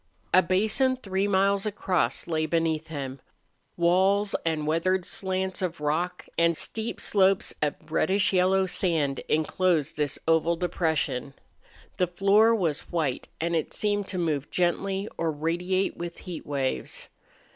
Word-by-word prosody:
A 185 - +8
basin 215 +9 +1
three 195 -4 -1
miles 200 +1 +2
across 180 - 0
lay 160 -2 -1
beneath 160 -1 0
him. 140 -4 -5 0.6
Walls 190 +4 +3
and 160 -2 -1
weathered 175 +4 +1
slants 190 0 -2
of 175 -3 -2
rock 160 +5 -1
and 170 -1 +3
steep 225 +1 -3
slopes 195 -1 +3
of 150 -1 +1 0.2
reddish 190 +5 +2
yellow 190 +1 +3
sand 160 -7 0
inclosed 160 0 +1
this 145 -2 -1
oval 165 +1 +3
depression. 160 -6 -1 0.6
The 180 - +2
floor 200 +6 +4
was 165 -8 -1
white, 155 -7 -1
and 170 +1 0
it 160 - -2
seemed 205 -1 0
to 185 - -5
move 155 -5 -1
gently 190 +3 0
or 165 - +1
radiate 175 +5 -1
with 170 0 -6
heat 175 -4 -7
waves. 140 -2 -2
175 Hz, 135 wpm, -27 LUFS, 160-190 Hz, 0.6 s, A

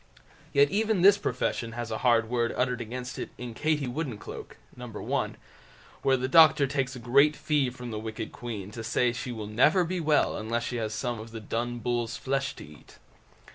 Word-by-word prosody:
Yet 140 +1 +4
even 215 -3 +1
this 200 +1 +7
profession 115 - -2
has 120 -1 -5
a 110 - -2
hard 115 -2 +3
word 120 0 0
uttered 125 -1 0
against 125 +3 -6
it - - -4
in 125 -2 -6
"Katie 150 +3 0
Woodencloak", 125 -4 -5 0.2
No. 125 - -8
l, 115 - -2 0.7
where 135 -1 +3
the 130 +1 -1
doctor 155 -1 +7
takes 135 -1 -2
a - - -7
great 140 +6 +4
fee 145 -4 +1
from 125 -1 -8
the 110 - -3
wicked 110 0 -5
queen 105 -5 -6
to 115 +1 -7
say 120 +2 +1
she 120 +1 -5
will 110 -3 -5
never 130 - +4
be 180 +2 -2
well 155 -2 +2
unless 115 +2 -2
she 120 - -3
has 110 -2 -2
some 120 0 -2
of 110 +1 -8
the 115 0 -7
Dun 120 +3 -3
Bull's 120 0 -2
flesh 135 0 -2
to - - -10
eat. 75 0 -16
125 Hz, 200 wpm, -28 LUFS, 115-140 Hz, 0.7 s, this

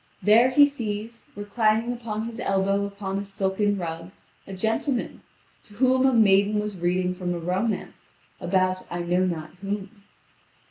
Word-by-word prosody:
There 225 +5 +6
he 285 +3 +7
sees, 230 -4 -5
reclining 215 +3 0
upon 225 -2 -4
his 230 0 -7
elbow 195 +1 +1
upon 200 -1 -4
a - - -4
silken 200 +1 -1
rug, 165 -1 -5 0.4
a 195 - -7
gentleman, 225 +6 -2 0.4
to 205 - -15
whom 260 +2 +3
a - - +4
maiden 210 -2 +4
was 210 -3 -4
reading 180 +1 0
from 180 -1 -3
a - - -4
romance 185 +6 -3 0.3
about 185 0 0
I 175 - -3
know 180 +2 +1
not 160 -3 -4
whom. 200 +1 -5
200 Hz, 150 wpm, -25 LUFS, 185-225 Hz, 0.4 s, he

